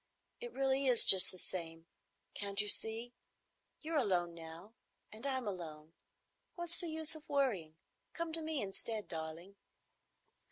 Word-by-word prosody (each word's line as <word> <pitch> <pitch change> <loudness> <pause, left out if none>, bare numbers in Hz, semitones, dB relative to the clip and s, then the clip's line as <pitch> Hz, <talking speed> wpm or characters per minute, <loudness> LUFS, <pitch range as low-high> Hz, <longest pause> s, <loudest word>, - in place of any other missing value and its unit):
It 480 0 -7
really 270 0 0
is 245 -3 +6
just 185 -1 +10
the 185 - -4
same. 165 -3 -6 0.5
Can't 200 -1 -3
you 210 - +3
see? 225 +3 0 0.7
You're 320 -1 -1
alone 180 -7 0
now 165 +5 -11 0.4
and 220 +6 -6
I'm 260 -4 -2
alone. 160 -5 -7 0.6
What's 345 -1 -2
the 345 - -2
use 315 0 -2
of 315 -1 -12
worrying? 220 - -1 0.4
Come 335 -1 -5
to 330 - -1
me 310 -4 -3
instead, 210 +2 -4
darling." 165 +4 -7
215 Hz, 145 wpm, -35 LUFS, 175-280 Hz, 0.7 s, just